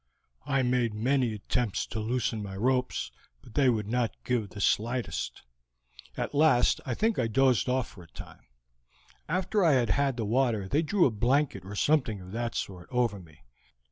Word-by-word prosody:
I 135 -2 +2
made 125 -3 +1
many 125 +2 +1
attempts 105 +1 -1
to 110 - -5
loosen 115 0 -1
my 100 -2 -6
ropes, 125 +3 0 0.3
but 115 - -15
they 135 0 +4
would 110 -4 0
not 120 0 0
give 120 -5 -1
the 105 - -10
slightest. 120 +5 -1 0.7
At - - -3
last 145 -4 +4
I 120 - -1
think 225 - +1
I 120 - +1
dozed 130 +2 +2
off 130 -2 0
for 90 - -14
a 85 - -14
time. - - -12 0.8
After 190 +4 +1
I 165 -4 +5
had 120 -5 +2
had 140 -1 +1
the 115 - -2
water 115 -3 +1
they 145 +11 +2
drew 180 +3 +2
a 130 - +3
blanket 120 -1 +1
or 100 +2 -8
something 125 -5 +1
of 90 0 -11
that 115 +2 -3
sort 90 -3 -5
over 120 -5 0
me. 75 -7 -17
120 Hz, 180 wpm, -28 LUFS, 105-135 Hz, 0.8 s, I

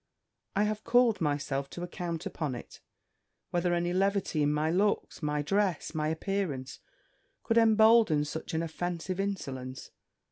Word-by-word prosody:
I 205 - +3
have 215 0 -1
called 240 -3 +3
myself 145 -2 -1
to 175 - -7
account 175 -2 -4
upon 150 -6 -3
it, 120 - -10 0.7
whether 175 0 +1
any 175 +1 0
levity 195 -4 +1
in 145 0 +3
my 150 +2 +1
looks, 200 +2 0
my 150 -1 -1
dress, 195 -1 0
my 155 -1 -1
appearance, 160 -5 -2 0.6
could 230 0 +3
embolden 220 -8 +5
such 160 +2 -5
an 160 - 0
offensive 175 +2 -3
insolence. 135 -10 -4
175 Hz, 140 wpm, -30 LUFS, 150-200 Hz, 0.7 s, embolden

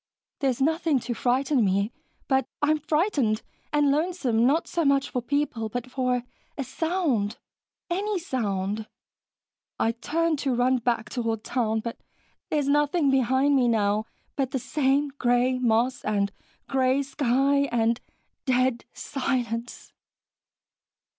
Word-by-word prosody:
There's 265 -4 0
nothing 315 0 +2
to 240 - -3
frighten 255 +2 +1
me, 200 +2 +1 0.4
but 265 -1 +2
I 295 0 +2
am 310 - +2
frightened... 300 - +1 0.3
and 295 -1 +3
lonesome, 285 -7 +1
not 310 +5 +2
so 340 - -1
much 280 -1 +2
for 250 - -1
people, 245 -4 -1
but 245 +3 -5
for 250 -2 0 0.3
a 275 - -1
sound... 270 - -1 0.5
any 400 +4 -1
sound. 215 - -2 0.9
I 225 - +2
turn 315 +7 0
to 270 -3 0
run 250 +1 +2
back 230 -2 -1
toward 225 -3 -2
town, 225 -3 0
but 230 +1 -6 0.5
there's 295 -3 0
nothing 295 +1 +3
behind 265 +2 +3
me 255 -3 +3
now 215 -1 +1 0.3
but 270 -3 0
the 265 - -2
same 275 +2 +1
gray 245 +1 +2
moss 240 +1 +1
and 200 -1 0 0.4
gray 265 +1 +2
sky 275 +1 +1
and 230 +1 +1 0.4
dead 255 -2 +1
silence." 245 -3 -3
260 Hz, 130 wpm, -26 LUFS, 235-285 Hz, 0.9 s, and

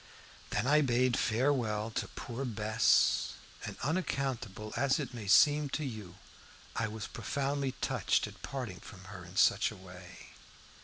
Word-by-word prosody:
Then 105 - 0
I 150 +3 +5
bade 125 -2 +2
farewell 115 -3 +1
to - - -2
poor 125 +2 -6
Bess, 110 -3 +2 0.3
and, - - -6
unaccountable 135 - -2
as 135 +3 +2
it 135 -4 -4
may 110 -4 -7
seem 145 +7 +5
to 155 - -3
you, 105 -9 -7 0.6
I 110 - 0
was 110 -1 -5
profoundly 140 -1 -2
touched - - +1
at - - -11
parting 120 -9 -5
from 95 -1 -12
her 90 -2 -8
in 90 +2 -12
such - - +4
a 110 - -9
way. 90 0 -12
120 Hz, 150 wpm, -32 LUFS, 105-135 Hz, 0.6 s, I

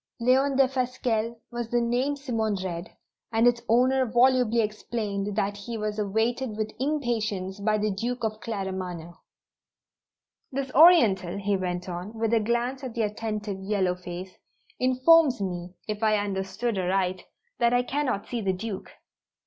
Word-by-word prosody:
"Leon 265 +3 +3
Defasquelle" 250 -4 +1 0.2
was 240 -1 -4
the 240 - +2
name 245 +4 0
Simone 225 -7 -1
read, 175 -1 -4 0.4
and 225 +1 +3
its 240 -1 +4
owner 255 +3 +4
volubly 245 -1 +3
explained 210 -2 -2
that 200 -1 0
he 225 +3 -6
was 215 0 -3
awaited 220 +3 -1
with 215 0 -3
impatience 220 -9 -1
by 215 +1 +1
the 210 0 0
Duke 235 +5 -3
of 215 -1 -2
Claremanagh. 185 -6 -5 1.4
"This 270 0 -3
Oriental," 220 - +6
he 200 0 0
went 180 -1 -3
on, 180 +4 -5
with 225 0 0
a 230 - +5
glance 240 +5 -1
at 250 -3 -6
the 230 - +1
attentive 210 -1 -3
yellow 190 -2 0
face, 180 +1 -8 0.4
"informs 260 +3 +5
me, 180 -2 -4
if 210 0 -3
I 215 -1 +3
understand 200 +2 -2
aright, 185 0 0 0.3
that 235 0 +4
I 245 0 +3
cannot 255 -5 -1
see 240 -2 -3
the 190 -2 0
Duke." 195 +1 -5
220 Hz, 150 wpm, -26 LUFS, 195-245 Hz, 1.4 s, Oriental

